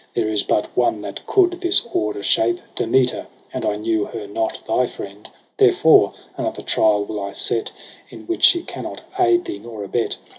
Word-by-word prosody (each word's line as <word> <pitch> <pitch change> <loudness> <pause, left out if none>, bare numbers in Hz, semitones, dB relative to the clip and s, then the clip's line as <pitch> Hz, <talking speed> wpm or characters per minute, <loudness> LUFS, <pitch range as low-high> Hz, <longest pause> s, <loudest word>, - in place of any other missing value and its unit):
There 110 -2 0
is 105 -1 +1
but 105 - -1
one 120 -4 +1
that 100 -1 -8
coud 355 -2 +2
this 355 -4 +4
order 105 -1 -1
shape, 115 +3 +2
Demeter, 125 +2 +1
— - - -30
but - - -4
I 105 - 0
knew 110 0 -1
her 110 -3 -7
not 110 +2 -3
thy 125 +3 +2
friend. 100 -1 -10 0.3
Therefore - - +5 0.2
another - - -3
trial 105 -1 +2
will 105 0 -5
I 100 0 -5
set. 115 - -1 0.4
In - - -12
which 345 - -3
she 345 -1 +6
cannot - - -7 0.2
aid 360 -1 +3
thee 345 - -5
nor 110 -3 -8
abet. 115 +4 -2
110 Hz, 185 wpm, -21 LUFS, 105-130 Hz, 0.4 s, she